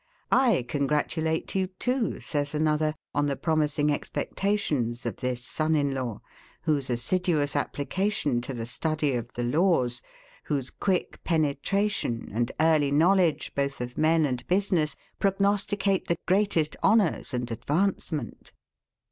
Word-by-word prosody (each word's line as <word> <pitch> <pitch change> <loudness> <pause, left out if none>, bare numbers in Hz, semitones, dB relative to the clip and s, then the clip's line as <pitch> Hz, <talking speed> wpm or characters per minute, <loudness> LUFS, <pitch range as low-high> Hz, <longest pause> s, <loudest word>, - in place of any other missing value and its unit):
] - - -37
I 235 - +4
congratulate 150 +3 0
you 190 -1 +1
too, 245 +6 -1
says 145 0 -2
another, 155 0 +1 0.2
on 145 0 +1
the 140 - 0
promising 150 -1 +1
expectations 145 - -1
of - - -3
this 125 -1 -3
son 155 +5 0
in 140 -2 +1
law; 125 -5 -4 0.4
whose 145 -5 0
assiduous 150 +4 +1
application 145 -2 0
to 130 +2 -5
the 115 -1 -4
study 155 +3 -1
of 120 -1 -3
the 120 - -3
laws, 130 -2 +2 0.4
whose 140 -4 -2
quick 190 -3 -1
penetration 160 - 0
and 120 +2 0
early 155 -3 +4
knowledge 170 +3 +3
both 140 0 -1
of 125 0 -5
men 160 0 +3
and 125 -3 -3
business, 180 -6 +1 0.2
prognosticate 200 0 +1
the 170 - +1
greatest 185 -5 +2
honours 210 -10 +3
and 125 -2 -3
advancement. 155 - -2
155 Hz, 130 wpm, -27 LUFS, 135-185 Hz, 0.4 s, I